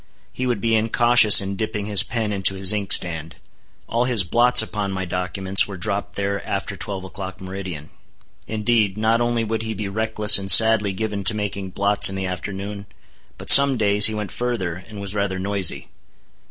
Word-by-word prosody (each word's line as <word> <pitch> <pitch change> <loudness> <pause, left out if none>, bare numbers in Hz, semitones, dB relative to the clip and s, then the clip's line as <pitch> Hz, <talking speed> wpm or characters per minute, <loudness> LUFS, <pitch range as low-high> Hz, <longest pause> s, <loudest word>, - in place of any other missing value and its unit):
He 130 - -5
would 120 -4 -3
be 115 +3 -2
incautious 115 0 +3
in 100 0 -6
dipping 105 0 -5
his 105 -3 +4
pen 115 -4 -4
into 95 -1 -1
his 95 +2 +1
inkstand. 85 -5 -1 0.5
All 120 +1 -2
his 120 -6 +1
blots 120 +6 +4
upon 105 -2 -6
my 95 -1 -5
documents, 95 +2 -3
were 100 -2 -9
dropped 100 +2 -4
there 100 0 -4
after - - -6
twelve 95 -2 -8
o'clock, 95 0 -10
meridian. 95 -5 -9 0.6
Indeed, 110 -2 -2
not 110 +2 0
only 120 -1 -2
would 110 0 -4
he 110 -1 -6
be 100 0 -6
reckless 105 0 +1
and 95 0 -8
sadly 110 -1 +6
given 105 0 -6
to 110 - +3
making 100 -2 -6
blots 100 +2 +4
in 95 - -7
the 95 0 -5
afternoon, 100 +2 -8 0.5
but - - +3
some 140 -1 +9
days 105 -1 +4
he 110 - -5
went 105 -2 -6
further, 95 -8 -5
and 105 -2 -11
was 100 -1 -6
rather 100 -2 -3
noisy. 95 -1 -1
100 Hz, 180 wpm, -19 LUFS, 95-110 Hz, 0.6 s, some